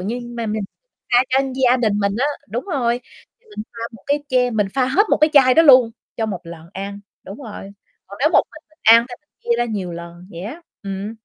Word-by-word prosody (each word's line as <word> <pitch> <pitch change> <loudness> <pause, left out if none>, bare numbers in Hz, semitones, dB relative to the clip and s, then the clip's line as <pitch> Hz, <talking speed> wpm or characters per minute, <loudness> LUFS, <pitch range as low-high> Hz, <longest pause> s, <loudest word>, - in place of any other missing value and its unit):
như 225 +7 -3 0.2
mà 230 -1 -3
mình 215 0 -2 0.5
pha 245 - +7
cho 260 - +2 0.3
gia 250 0 +5
đình 230 -4 +1
mình 200 -1 0
á 270 - +2 0.2
đúng 230 +5 -4
rồi, 245 -9 -1 0.4
thì 485 - -33
mình 210 - -3
pha 230 - -8
một 225 -4 -14
cái 285 +1 0
che 250 -1 +2
mình 215 -3 0
pha 260 -2 +2
hết 380 +12 +3
một - - +4
cái 305 +1 +3
chai 260 -3 +6
đó 325 - +6
luôn 255 -6 +7 0.3
cho 225 - -1
một 195 -5 -4
lần 165 -1 -11
ăn, 200 +1 -6 0.2
đúng 195 - -9
rồi. 205 -4 -9 0.4
Còn 200 - -11
nếu 300 - +4
một - - +6
mình 310 - -13
mình 310 - -29
ăn 230 +2 +7
thì 245 - -7
mình 300 - -48
chia 235 0 +1
ra 240 - +2
nhiều 200 -6 -4
lần 170 +1 -10
vậy 170 -3 -9
á, 280 - -8 0.2
ừm. 200 +2 -5
230 Hz, 245 wpm, -20 LUFS, 200-260 Hz, 0.5 s, pha